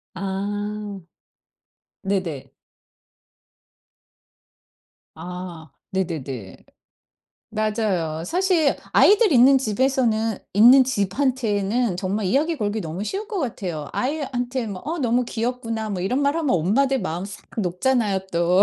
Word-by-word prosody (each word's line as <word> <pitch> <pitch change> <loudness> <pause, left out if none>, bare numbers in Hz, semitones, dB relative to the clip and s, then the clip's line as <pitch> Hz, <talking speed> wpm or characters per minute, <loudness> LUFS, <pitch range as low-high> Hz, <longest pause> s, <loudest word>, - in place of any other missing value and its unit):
아 205 +1 -4 1.0
네네. 185 -8 -2 2.6
아 175 -1 -8 0.2
네네네. 140 - -4 1.0
맞아요. 210 -8 -1
사실 350 - +2 0.2
아이들 420 -1 +6
있는 265 +2 +7
집에서는 225 -2 +1 0.2
있는 250 +5 +8
집한테는 225 -2 0
정말 200 +1 -1
이야기 305 - +1
걸기 210 -2 -1
너무 165 +3 -5
쉬울 400 - -4
것 410 -4 -3
같아요. 180 - -4
아이한테 255 -3 -2
뭐 190 -2 -6
"어 325 +3 -3
너무 245 -1 +2
귀엽구나." 230 -2 -3
뭐 185 - -3
이런 245 +10 0
말하면 290 +1 +1
엄마들 260 - +2
마음 175 +4 -3
싹 200 - -11
녹잖아요, 200 +2 +1
또. 175 +3 +4
215 Hz, 230 characters per minute, -23 LUFS, 185-260 Hz, 2.6 s, 있는